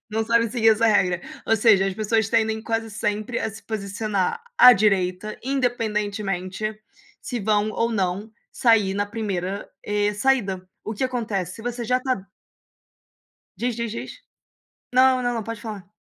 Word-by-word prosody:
Não 220 Hz, +1 st, 0 dB
sabem 230 Hz, -1 st, +3 dB
seguir 225 Hz, -2 st, +4 dB
essa 225 Hz, +1 st, +3 dB
regra, 180 Hz, -5 st, +3 dB, 0.3 s
ou 225 Hz, -, +4 dB
seja, 205 Hz, -3 st, +5 dB
as 195 Hz, -, -2 dB
pessoas 220 Hz, +1 st, +1 dB
tendem 220 Hz, -1 st, +1 dB
quase 225 Hz, 0 st, -2 dB
sempre 210 Hz, +2 st, -2 dB
a -, -, -1 dB
se 220 Hz, +1 st, -11 dB
posicionar 210 Hz, -, -2 dB, 0.2 s
à 250 Hz, -, +11 dB
direita, 195 Hz, -1 st, +1 dB
independentemente 215 Hz, -6 st, -2 dB, 0.4 s
se 245 Hz, -, -4 dB
vão 210 Hz, 0 st, +1 dB
ou 230 Hz, +1 st, 0 dB
não 195 Hz, +1 st, -1 dB, 0.2 s
sair 220 Hz, -5 st, +3 dB
na 205 Hz, +1 st, -1 dB
primeira, 200 Hz, -3 st, -4 dB
eh, 210 Hz, 0 st, +1 dB
saída. 205 Hz, -6 st, 0 dB
O 215 Hz, -, -4 dB
que 260 Hz, -, -1 dB
acontece, 215 Hz, -8 st, -2 dB
se 225 Hz, -, -10 dB
você 240 Hz, 0 st, -3 dB
já 250 Hz, +2 st, +1 dB
tá 255 Hz, -6 st, -1 dB, 1.4 s
Diz, 240 Hz, 0 st, -1 dB
diz, 235 Hz, -2 st, -2 dB
diz. -, -, -7 dB, 0.7 s
Não, 255 Hz, 0 st, +5 dB
não, 245 Hz, 0 st, 0 dB
não. 225 Hz, -, -2 dB
Pode 230 Hz, 0 st, -6 dB
falar. 210 Hz, -5 st, -7 dB
215 Hz, 155 wpm, -23 LUFS, 200-230 Hz, 1.4 s, à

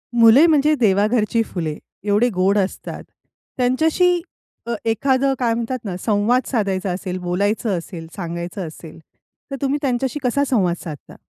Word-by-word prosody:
मुले 235 Hz, +6 st, +7 dB
म्हणजे 305 Hz, -1 st, +4 dB
देवाघरची 215 Hz, +1 st, +2 dB
फुले. 160 Hz, -7 st, -4 dB, 0.3 s
एवढे 210 Hz, +4 st, +2 dB
गोड 190 Hz, +3 st, +2 dB
असतात, 190 Hz, -1 st, -3 dB, 0.5 s
त्यांच्याशी 320 Hz, +8 st, +2 dB, 0.4 s
अ, 235 Hz, -, -2 dB
एखादं 265 Hz, +4 st, +2 dB
काय 235 Hz, -2 st, +1 dB
म्हणतात 235 Hz, +2 st, -2 dB
ना, 190 Hz, -3 st, -3 dB
संवाद 220 Hz, +5 st, +1 dB
साधायचा 195 Hz, -5 st, -1 dB
असेल, 180 Hz, 0 st, -4 dB
बोलायचं 200 Hz, +3 st, 0 dB
असेल, 165 Hz, -1 st, -8 dB
सांगायचं 170 Hz, 0 st, -5 dB
असेल 160 Hz, 0 st, -11 dB, 0.5 s
तर -, -, -2 dB
तुम्ही 280 Hz, +1 st, 0 dB
त्यांच्याशी 265 Hz, +1 st, -1 dB
कसा 255 Hz, +3 st, +1 dB
संवाद 190 Hz, -10 st, +2 dB
साधता? 155 Hz, -5 st, -9 dB
220 Hz, 140 wpm, -20 LUFS, 185-255 Hz, 0.5 s, मुले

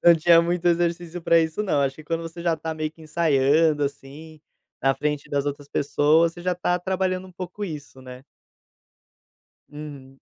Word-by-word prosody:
Não 170 Hz, -1 st, +8 dB
tinha 165 Hz, +1 st, +5 dB
muito 175 Hz, +1 st, -1 dB
exercício 170 Hz, 0 st, 0 dB
para 170 Hz, 0 st, +4 dB
isso 160 Hz, +5 st, 0 dB
não, 150 Hz, -8 st, +1 dB
acho 135 Hz, 0 st, -1 dB
que 155 Hz, -, -11 dB
quando 165 Hz, +1 st, -2 dB
você 165 Hz, +1 st, -8 dB
já 170 Hz, -2 st, +1 dB
tá 160 Hz, +1 st, -4 dB
meio 155 Hz, -1 st, -3 dB
que 160 Hz, 0 st, -18 dB
ensaiando, 155 Hz, -1 st, +2 dB
assim, 145 Hz, +3 st, -8 dB, 0.4 s
na 135 Hz, 0 st, +3 dB
frente 150 Hz, -1 st, -2 dB
das 140 Hz, -1 st, -1 dB
outras 145 Hz, 0 st, -5 dB
pessoas, 155 Hz, +4 st, +2 dB
você 175 Hz, -, -11 dB
já 180 Hz, 0 st, 0 dB
tá 180 Hz, 0 st, 0 dB
trabalhando 185 Hz, 0 st, -1 dB
um -, -, -16 dB
pouco 185 Hz, +3 st, -7 dB
isso, 150 Hz, -7 st, -7 dB
né? 130 Hz, 0 st, -11 dB, 1.5 s
Uhum. 140 Hz, -3 st, -10 dB
160 Hz, 180 wpm, -24 LUFS, 145-175 Hz, 1.5 s, Não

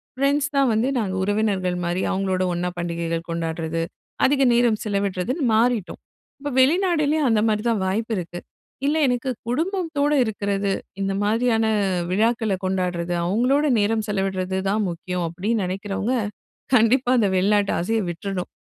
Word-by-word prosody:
Friends 280 Hz, +2 st, +1 dB
தான் 275 Hz, -2 st, +4 dB
வந்து 225 Hz, +4 st, +1 dB
நாங்க 200 Hz, -5 st, -1 dB
உறவினர்கள் 200 Hz, -3 st, 0 dB
மாரி. 175 Hz, +2 st, -1 dB
அவங்களோட 190 Hz, -1 st, 0 dB
ஒண்ணா 175 Hz, +1 st, -1 dB
பண்டிகைகள் 170 Hz, -1 st, -3 dB
கொண்டாடுறது, 165 Hz, 0 st, -2 dB, 0.4 s
அதிக 275 Hz, 0 st, +2 dB
நேரம் 235 Hz, -2 st, +3 dB
செலவிடுறதுன்னு 200 Hz, -, -1 dB
மாறிட்டோம். 230 Hz, -4 st, +1 dB, 0.4 s
இப்போ 290 Hz, +1 st, -4 dB
வெளிநாடுலயும் 310 Hz, 0 st, +3 dB
அந்த 215 Hz, -2 st, +3 dB
மாரி 210 Hz, -1 st, +1 dB
தான், 220 Hz, -4 st, 0 dB
வாய்ப்பு 220 Hz, +5 st, -1 dB
இருக்கு. 175 Hz, 0 st, -5 dB, 0.5 s
"இல்ல, 295 Hz, -, +2 dB
எனக்கு 245 Hz, +1 st, -1 dB, 0.2 s
குடும்பத்தோடு 310 Hz, 0 st, 0 dB
இருக்குறது, 200 Hz, -2 st, -1 dB, 0.3 s
இந்த 195 Hz, 0 st, 0 dB
மாரியான 225 Hz, +1 st, +2 dB, 0.5 s
விழாக்களை 220 Hz, 0 st, +1 dB
கொண்டாடுறது, 180 Hz, -2 st, -1 dB
அவங்களோட 250 Hz, +10 st, +2 dB
நேரம் 215 Hz, +1 st, +1 dB
செலவிடுறது 190 Hz, -2 st, -1 dB
தான் 210 Hz, +2 st, +1 dB
முக்கியம்" 180 Hz, +1 st, -4 dB
அப்படின்னு 205 Hz, +6 st, -1 dB
நெனைக்கிறவங்க, 195 Hz, +6 st, -2 dB, 0.6 s
கண்டிப்பா 245 Hz, +3 st, +3 dB
அந்த 215 Hz, -, +3 dB
வெளிநாட்டு 200 Hz, +2 st, +2 dB
ஆசையை 220 Hz, +6 st, 0 dB
விட்டுறணும். 180 Hz, +2 st, -4 dB
210 Hz, 130 wpm, -23 LUFS, 185-245 Hz, 0.6 s, தான்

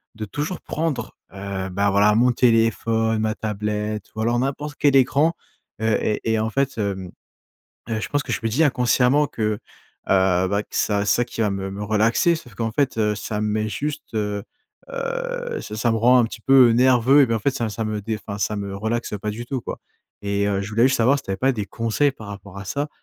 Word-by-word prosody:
de 110 Hz, 0 st, -5 dB
toujours 150 Hz, -, -4 dB
prendre, 160 Hz, -2 st, -3 dB, 0.2 s
heu, 100 Hz, -1 st, -4 dB
bah, 100 Hz, +2 st, +1 dB
voilà, 100 Hz, +2 st, +4 dB
mon 120 Hz, +3 st, +3 dB
téléphone, 115 Hz, -1 st, +2 dB
ma 110 Hz, 0 st, 0 dB
tablette 105 Hz, -1 st, -3 dB
ou -, -, -6 dB
alors 120 Hz, +2 st, +1 dB
n'importe 140 Hz, +3 st, -2 dB
quel 140 Hz, -2 st, +4 dB
écran, 140 Hz, +5 st, +3 dB, 0.5 s
heu 110 Hz, -1 st, +2 dB
et 105 Hz, -, 0 dB
et 110 Hz, -, +1 dB
en 110 Hz, +1 st, 0 dB
fait, 135 Hz, +2 st, -1 dB
hem, 95 Hz, -3 st, -3 dB, 0.8 s
heu, 110 Hz, -1 st, -1 dB
je -, -, -3 dB
pense 145 Hz, -, +1 dB
que -, -, -6 dB
je -, -, 0 dB
me 115 Hz, -, +1 dB
dit, 135 Hz, +9 st, +2 dB
inconsciemment, 130 Hz, +1 st, +3 dB
que, 115 Hz, -, -8 dB
heu, 105 Hz, -, -6 dB, 0.5 s
bah, 95 Hz, +1 st, +2 dB
que -, -, -33 dB
ça 100 Hz, -1 st, +1 dB
c'est -, -, +3 dB
ça 120 Hz, -, +1 dB
qui 115 Hz, -, -5 dB
va 105 Hz, -, +2 dB
me 95 Hz, +1 st, -4 dB
relaxer. 110 Hz, +10 st, +2 dB
Sauf 125 Hz, -8 st, -11 dB
qu'en 115 Hz, +1 st, -2 dB
fait, 130 Hz, 0 st, 0 dB
heu, 105 Hz, -1 st, +1 dB
ça 105 Hz, +1 st, -4 dB
me 105 Hz, -, 0 dB
met 110 Hz, 0 st, -1 dB
juste, 150 Hz, +4 st, -5 dB
heu 105 Hz, -1 st, -2 dB, 0.5 s
heu, -, -, -3 dB
ça -, -, -7 dB
ça 115 Hz, +2 st, +1 dB
me 115 Hz, -, +1 dB
rend 125 Hz, +3 st, +5 dB
un 120 Hz, -, +4 dB
petit 115 Hz, 0 st, -8 dB
peu 130 Hz, -1 st, +6 dB
nerveux, 130 Hz, +3 st, +5 dB
eh -, -, +4 dB
ben, 115 Hz, -, 0 dB
en -, -, -1 dB
fait, 140 Hz, +6 st, +1 dB
ça 120 Hz, -4 st, -2 dB
ça 110 Hz, +1 st, -3 dB
me 105 Hz, -1 st, -3 dB
dé 110 Hz, +1 st, -3 dB
enfin, 100 Hz, 0 st, -7 dB
ça 105 Hz, +2 st, 0 dB
me 100 Hz, -1 st, -4 dB
relaxe 110 Hz, +4 st, -2 dB
pas 105 Hz, -, -2 dB
du 115 Hz, +3 st, -6 dB
tout, 130 Hz, 0 st, -3 dB
quoi -, -, -6 dB, 0.4 s
et 100 Hz, 0 st, 0 dB
heu, 100 Hz, -1 st, 0 dB
je 100 Hz, -, -5 dB
voulais 110 Hz, +2 st, +2 dB
juste 130 Hz, -, +1 dB
savoir 125 Hz, +5 st, +4 dB
si 140 Hz, -, -8 dB
tu -, -, -15 dB
avais 95 Hz, -, -2 dB
pas 135 Hz, +5 st, +2 dB
des 105 Hz, -4 st, -3 dB
conseils 115 Hz, +7 st, 0 dB
par 110 Hz, -6 st, -12 dB
rapport 100 Hz, -1 st, -9 dB
à 95 Hz, -, -7 dB
ça, 145 Hz, +8 st, -2 dB
110 Hz, 235 wpm, -22 LUFS, 105-130 Hz, 0.8 s, peu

